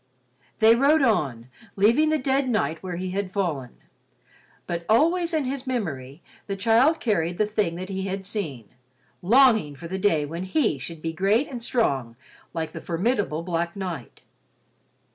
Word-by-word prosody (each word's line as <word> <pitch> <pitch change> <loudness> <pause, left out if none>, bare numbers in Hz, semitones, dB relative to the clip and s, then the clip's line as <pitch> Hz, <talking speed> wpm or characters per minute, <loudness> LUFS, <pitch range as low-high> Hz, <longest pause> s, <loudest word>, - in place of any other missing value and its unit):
They 225 0 +6
rode 280 +4 +4
on, 135 - 0 0.3
leaving 230 +10 +4
the 310 - +2
dead 265 -1 0
knight 215 -8 0
where 185 -2 -5
he 185 +1 -4
had 195 0 -3
fallen, 160 - -3 0.9
but 170 0 -3
always 335 +9 +3
in 315 -3 +1
his 265 0 -4
memory 155 - -4 0.2
the 195 - -2
child 235 +10 +3
carried 175 -6 0
the 215 - +2
thing 210 -5 -1
that 185 +2 -6
he 190 0 -3
had 190 0 -4
seen, 155 - -4 0.5
longing 220 - +4
for 170 +5 -9
the 190 +3 -4
day 165 -7 +2
when 165 +5 -5
he 190 - +1
should 160 +4 -8
be 165 0 -2
great 200 - +2
and 245 -3 -6
strong 135 - 0 0.4
like 160 -2 -4
the - - -8
formidable 180 -2 -1
black 170 -1 -2
knight. 180 -10 -6
195 Hz, 160 wpm, -25 LUFS, 165-235 Hz, 0.9 s, They